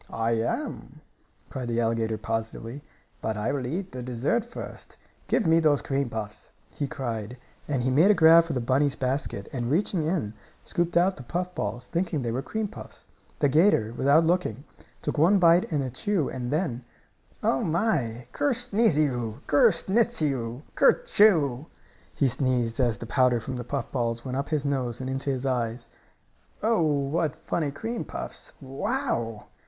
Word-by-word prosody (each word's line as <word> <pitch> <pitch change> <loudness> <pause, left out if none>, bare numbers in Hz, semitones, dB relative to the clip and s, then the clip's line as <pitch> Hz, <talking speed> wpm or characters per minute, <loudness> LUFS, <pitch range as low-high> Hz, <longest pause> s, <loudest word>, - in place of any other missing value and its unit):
"I 115 0 -1
am!" 115 0 -3 0.5
cried 125 -2 -4
the 120 0 0
alligator, 115 -1 0
positively. 115 +4 -4 0.4
"But 110 -1 -2
I 105 - -1
will 135 -3 -2
eat 185 +7 -4
the 125 - -6
dessert 125 - 0
first. 235 +1 -9 0.3
Give 225 - +1
me 165 0 +5
those 150 -3 +3
cream 135 -2 -1
puffs!" 110 -2 -6 0.2
he 145 - -2
cried 120 -3 -4 0.3
and 135 -4 -1
he 130 - +1
made 160 +9 +5
a 210 - +6
grab 165 0 +7
for 165 - -3
the 125 - -1
bunny's 135 +4 +2
basket, 130 -6 -2
and, 120 -3 -2
reaching 175 +3 +1
in, 155 - -1 0.3
scooped 175 0 0
out 185 +2 +3
the - - -8
puff 180 +8 -3
balls, 115 +1 -3
thinking 170 -3 -1
they 115 - -1
were 125 +3 -1
cream 215 +9 -3
puffs. - - -11 0.3
The 145 - +3
'gator, 135 - +3
without 145 +6 +4
looking, 160 - 0 0.4
took - - -2
one 180 +7 +5
bite 175 -1 +4
and 145 -3 +1
a 130 - -4
chew 170 - 0
and 125 -2 -4
then 145 -5 -1 0.6
"Oh, 135 - +2
my! 155 - 0
Ker 285 -3 +1
sneezio! 155 - +1
Ker 145 - +5
snitzio! 155 - 0
Ker - - +6
choo!" 160 - +3 0.5
he 140 - +2
sneezed 125 -2 0
as 120 -4 +2
the 115 - -7
powder 125 0 +3
from 130 +3 -5
the 120 - -4
puff 135 0 -4
balls 115 -2 -2
went 130 -1 -3
up 140 +1 -2
his 150 -3 -1
nose 130 -4 -1
and 130 - -4
into 135 +1 -2
his 135 -1 -2
eyes. 120 -3 -2 0.7
"Oh, 225 -3 +3
what 155 +1 0
funny 160 -1 -2
cream 225 +12 -4
puffs! - - -7
Wow!" 135 - -3
135 Hz, 170 wpm, -26 LUFS, 120-165 Hz, 0.7 s, grab